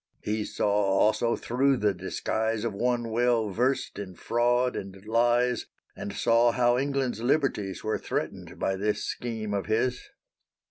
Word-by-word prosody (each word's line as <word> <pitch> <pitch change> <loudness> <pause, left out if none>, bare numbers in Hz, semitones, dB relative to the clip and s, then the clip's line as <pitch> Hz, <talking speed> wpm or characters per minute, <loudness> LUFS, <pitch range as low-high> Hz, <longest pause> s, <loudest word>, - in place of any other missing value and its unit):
He 105 0 -1
saw - - -1
also 105 +3 +2
thro' 135 +3 +1
the 105 -4 +1
disguise 110 +4 -2
Of 115 -3 -1
one 120 +2 0
well 115 -2 +2
versed 125 +2 0
in 95 -3 -7
fraud 120 +4 +1
and 95 0 -7
lies, 120 +2 +2 0.3
And 100 - -5
saw 115 +2 +3
how 120 0 +3
England's 135 -3 -1
liberties 120 -7 0
Were 110 - -1
threatened - - -4
by 95 - -1
this 105 +2 -1
scheme 110 -3 -4
of 100 -1 -2
his. 125 +3 +1
115 Hz, 145 wpm, -27 LUFS, 105-125 Hz, 0.3 s, saw